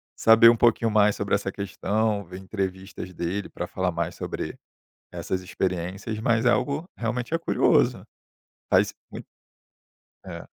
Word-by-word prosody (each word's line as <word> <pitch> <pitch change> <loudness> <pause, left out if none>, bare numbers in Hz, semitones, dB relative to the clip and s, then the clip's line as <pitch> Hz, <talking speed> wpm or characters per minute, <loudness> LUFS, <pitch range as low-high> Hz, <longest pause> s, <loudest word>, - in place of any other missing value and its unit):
saber 115 +1 +7
um 120 - +4
pouquinho 115 0 +3
mais 105 -1 +3
sobre 100 0 0
essa 100 -1 -2
questão, 100 +2 -1
ver 90 +2 -9
entrevistas 95 -1 -5
dele 90 +4 -3
para 90 - -5
falar 95 0 -1
mais 85 0 -3
sobre - - -5 0.6
essas 95 0 -3
experiências, 95 +4 -3
mas 115 +1 +1
é - - +6
algo 145 +7 -1
realmente 120 +5 -3
é - - +2
curioso. 165 - +2 0.7
Faz - - +3 0.2
mui - - -8 1.0
é, - - -8
100 Hz, 140 wpm, -25 LUFS, 95-115 Hz, 1.0 s, saber